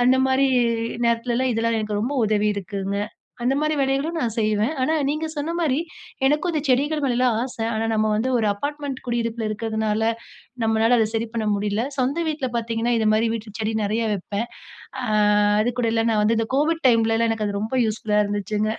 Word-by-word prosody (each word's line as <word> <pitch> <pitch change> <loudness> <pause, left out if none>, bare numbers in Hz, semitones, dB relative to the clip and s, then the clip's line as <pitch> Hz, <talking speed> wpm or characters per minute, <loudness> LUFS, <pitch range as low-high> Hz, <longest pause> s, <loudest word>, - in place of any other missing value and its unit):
அந்த 255 +2 +5
மாரி 265 +1 +3 0.6
நேரத்துலலாம், 235 +2 +1
இதெல்லாம் 230 0 0
எனக்கு 210 -1 -2
ரொம்ப 240 +6 -1
உதவிருக்குங்க. 200 -2 -1 0.4
அந்த 250 +3 +2
மாதிரி 305 0 +1
வேலைகளும் 275 +5 0
நான் 230 -6 -1
செய்வேன். 215 +5 +1
ஆனா, 310 +5 +2
நீங்க 305 +2 -1
சொன்ன 305 +3 -2
மாரி, 290 -5 +1 0.5
எனக்கும் 300 +5 +1
இந்த 310 - 0
செடிகள் 290 +4 +2
மேலலாம் 250 -2 +2
ஆசை. 250 -3 -4
ஆனா, 220 +1 -1
நம்ம 215 0 +1
வந்து 225 +5 0
ஒரு 220 - +1
அப்பார்ட்மெண்ட் 285 +3 -4
குடியிருப்புல 230 -1 -1
இருக்கிறதுனால, 220 0 -1 0.6
நம்மளால 225 +2 +3
அதை 220 - +3
சரி 225 +1 -1
பண்ண 220 -2 -1
முடியல. 205 +2 -1 0.2
சொந்த 265 +6 0
வீட்டுல 295 -4 -2
பாத்தீங்கன்னா, 230 +1 -1
இது 220 - +1
மாரி 225 +1 +2
வீட்டு 215 -2 -8
செடி 220 0 -1
நெறைய 220 +3 0
வைப்பேன். 205 +3 -3 0.6
ஆ - - -2 0.6
அது 245 +3 0
கூட 230 - +1
இல்ல, 225 0 +2
நான் 215 -2 +2
வந்து 225 +1 +2
இந்த 225 -1 -1
கோவிட் 320 +3 +1
டைம்லலாம் 230 -1 +3
எனக்கு 220 -1 -1
அது 200 0 -2
ரொம்ப 225 +4 -1
யூஸ்ஃபுல்லா 210 -1 0
இருந்துச்சுங்க. 205 +1 -1
230 Hz, 180 wpm, -23 LUFS, 215-260 Hz, 0.6 s, அந்த